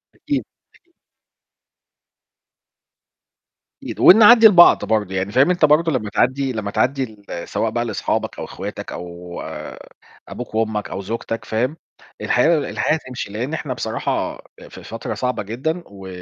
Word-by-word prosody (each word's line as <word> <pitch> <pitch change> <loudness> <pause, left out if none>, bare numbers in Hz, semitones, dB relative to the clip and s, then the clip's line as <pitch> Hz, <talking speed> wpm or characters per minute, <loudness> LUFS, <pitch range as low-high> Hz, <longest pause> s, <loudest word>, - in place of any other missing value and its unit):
أكيد. 290 -2 -3 0.3
أكي 350 - -28 2.9
أكيد، - - -7
ونعدّي 220 +3 +8
لبعض 180 -5 +6
برضه 105 -4 -1
يعني 95 +2 -2
فاهم 135 +8 +4
أنت 175 -3 +3
برضه 160 +2 +3
لمّا 110 -6 -2
تعدّي 130 +4 0
لمّا 105 -2 -4
تعدّي 135 +1 0 0.2
ل 85 - -6
سواء 115 - -1
بقى 120 +1 -1
لأصحابك 110 - -3
أو - - -4
إخواتك - - -7
أو 85 0 -8 0.9
أبوك 120 -3 -8
وأمك 110 -2 -1
أو - - -5
زوجتك 115 +2 -5
فاهم؟ 125 +8 -1 0.4
الحياة 160 +7 +3
الحياة 150 - -1
هتمشي 125 -8 -7
لإن 125 +8 -4
إحنا 145 -4 -3
بصراحة 110 -2 -3 0.3
آآ - - -13
في - - -12
فترة - - -6
صعبة 125 -3 -2
جدًا 140 - -3
و 95 -1 -12
125 Hz, 140 wpm, -20 LUFS, 105-155 Hz, 2.9 s, ونعدّي